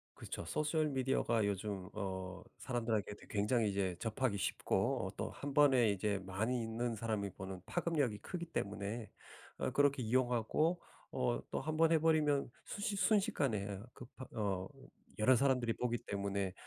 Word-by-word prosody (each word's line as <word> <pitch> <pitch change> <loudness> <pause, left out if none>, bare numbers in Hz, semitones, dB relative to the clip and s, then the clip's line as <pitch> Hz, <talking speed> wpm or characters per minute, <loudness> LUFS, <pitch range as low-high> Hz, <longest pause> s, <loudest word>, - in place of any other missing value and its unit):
그렇죠. - - -6
소셜 155 - +1
미디어가 130 -5 +1
요즘 100 -1 -2
어 95 -2 -4 0.2
사람들에게도 115 -5 -2
굉장히 105 +2 +2
이제 95 -2 0
접하기 115 -1 0
쉽고 - - 0
어 - - -3
또 - - -2
1 145 0 -5
번에 135 -6 +6
이제 100 0 0
많이 110 +6 0
있는 115 +1 -2
사람이 105 -3 -2
보는 95 0 -7
파급력이 150 - 0
크기 170 - -5
때문에 105 -6 -3 0.5
어 - - -1
그렇게 140 0 +3
이용하고 125 +8 +2 0.3
어 - - 0
또 - - -1
1 155 0 -2
번 165 0 +5
해 165 - +6
버리면 150 -4 +3
순시 205 0 -2
순식간에 195 - +2
어 100 +5 -9
그 125 - -10
파 130 - -7
어 95 -3 0 0.5
여러 130 +4 +6
사람들이 125 -2 +2
보기 120 0 -1
때문에 100 -1 -1
115 Hz, 315 characters per minute, -36 LUFS, 100-140 Hz, 0.5 s, 번에